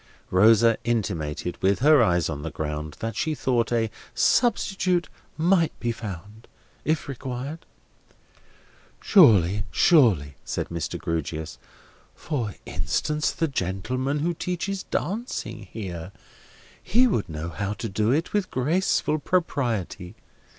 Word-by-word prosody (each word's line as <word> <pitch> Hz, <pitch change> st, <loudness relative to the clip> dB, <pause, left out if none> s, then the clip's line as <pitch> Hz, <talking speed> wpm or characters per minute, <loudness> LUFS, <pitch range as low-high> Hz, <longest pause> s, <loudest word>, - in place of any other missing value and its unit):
Rosa 110 Hz, +4 st, +5 dB
intimated, 90 Hz, -8 st, -2 dB
with 95 Hz, +1 st, +3 dB
her 150 Hz, -1 st, +6 dB
eyes 90 Hz, -6 st, +2 dB
on 75 Hz, -3 st, -4 dB
the 80 Hz, -, -4 dB
ground, 75 Hz, 0 st, -5 dB
that 115 Hz, 0 st, -3 dB
she 155 Hz, -1 st, -1 dB
thought 120 Hz, -5 st, 0 dB
a 115 Hz, -2 st, +1 dB, 0.2 s
substitute 190 Hz, -7 st, +2 dB, 0.3 s
might 170 Hz, 0 st, +2 dB
be 120 Hz, -, -1 dB
found, 105 Hz, -1 st, -8 dB, 0.4 s
if 155 Hz, +1 st, 0 dB
required. 135 Hz, +3 st, -6 dB, 1.3 s
"Surely, 105 Hz, -, +5 dB
surely," 100 Hz, -, +4 dB
said -, -, -3 dB
Mr. 85 Hz, -4 st, -3 dB
Grewgious. 80 Hz, -1 st, -4 dB, 0.6 s
"For 120 Hz, -, -3 dB
instance, 90 Hz, -, -1 dB
the 165 Hz, -, -1 dB
gentleman 130 Hz, -, -2 dB
who 170 Hz, +3 st, 0 dB
teaches 180 Hz, +3 st, -3 dB
Dancing 150 Hz, -, -4 dB
here—he 100 Hz, -, -3 dB
would 190 Hz, -, 0 dB
know 80 Hz, +1 st, -5 dB
how 105 Hz, +3 st, -3 dB
to 115 Hz, -, -5 dB
do 105 Hz, +3 st, 0 dB
it 155 Hz, +5 st, 0 dB
with 205 Hz, -3 st, 0 dB
graceful 155 Hz, +3 st, +1 dB
propriety. 120 Hz, -, -1 dB
115 Hz, 115 wpm, -25 LUFS, -, 1.3 s, her